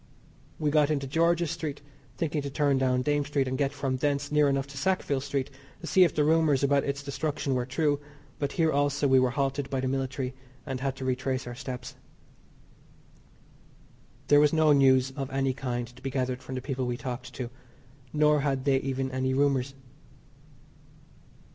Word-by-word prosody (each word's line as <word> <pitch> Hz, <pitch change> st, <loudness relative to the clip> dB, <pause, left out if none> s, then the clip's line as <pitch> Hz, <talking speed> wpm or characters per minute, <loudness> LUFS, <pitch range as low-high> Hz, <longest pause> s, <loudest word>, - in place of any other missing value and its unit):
We 150 Hz, -1 st, 0 dB
got 150 Hz, -1 st, +4 dB
into 140 Hz, -3 st, 0 dB
George's 165 Hz, +3 st, +1 dB
Street, 160 Hz, -4 st, -4 dB, 0.4 s
thinking 155 Hz, -2 st, -1 dB
to 140 Hz, -, -4 dB
turn 140 Hz, -1 st, +1 dB
down 125 Hz, -1 st, +1 dB
Dame 145 Hz, 0 st, +1 dB
Street 140 Hz, -1 st, 0 dB
and 130 Hz, -, -2 dB
get 140 Hz, +1 st, 0 dB
from 135 Hz, -2 st, -2 dB
thence 145 Hz, +1 st, -1 dB
near 150 Hz, -1 st, +4 dB
enough 135 Hz, -1 st, 0 dB
to 140 Hz, -, -10 dB
Sackville 175 Hz, -6 st, 0 dB
Street 140 Hz, -1 st, -2 dB, 0.3 s
to -, -, -8 dB
see 185 Hz, +2 st, +5 dB
if 175 Hz, -, +2 dB
the 150 Hz, -, +3 dB
rumours 155 Hz, -3 st, +3 dB
about 140 Hz, 0 st, +3 dB
its 140 Hz, 0 st, -3 dB
destruction 140 Hz, 0 st, -2 dB
were 125 Hz, -1 st, -1 dB
true, 145 Hz, +2 st, +1 dB, 0.4 s
but 140 Hz, -1 st, -2 dB
here 160 Hz, -2 st, +2 dB
also 145 Hz, 0 st, +1 dB
we 130 Hz, -1 st, +5 dB
were 130 Hz, -1 st, +3 dB
halted 135 Hz, +1 st, -1 dB
by 135 Hz, -, -1 dB
the 130 Hz, -, -1 dB
military, 130 Hz, 0 st, -2 dB, 0.3 s
and 130 Hz, -1 st, -4 dB
had 135 Hz, 0 st, -2 dB
to 130 Hz, -1 st, -6 dB
retrace 130 Hz, 0 st, -1 dB
our 120 Hz, -, -6 dB
steps. 125 Hz, 0 st, -7 dB, 2.3 s
There 145 Hz, -, +6 dB
was 150 Hz, +1 st, +4 dB
no 155 Hz, -2 st, +5 dB
news 135 Hz, -1 st, +4 dB
of 135 Hz, -1 st, -5 dB
any 135 Hz, -1 st, 0 dB
kind 125 Hz, -2 st, -3 dB
to -, -, -16 dB
be 135 Hz, -, -3 dB
gathered 130 Hz, -1 st, -2 dB
from 130 Hz, -, -7 dB
the 130 Hz, -, -3 dB
people 130 Hz, -1 st, -3 dB
we 120 Hz, 0 st, -2 dB
talked 125 Hz, -1 st, -6 dB
to, 125 Hz, -2 st, -5 dB, 0.6 s
nor 150 Hz, 0 st, +3 dB
had 135 Hz, -2 st, -1 dB
they 135 Hz, -2 st, +4 dB
even 135 Hz, 0 st, -2 dB
any 130 Hz, 0 st, 0 dB
rumours. 135 Hz, -1 st, +1 dB
135 Hz, 185 wpm, -28 LUFS, 130-145 Hz, 2.3 s, There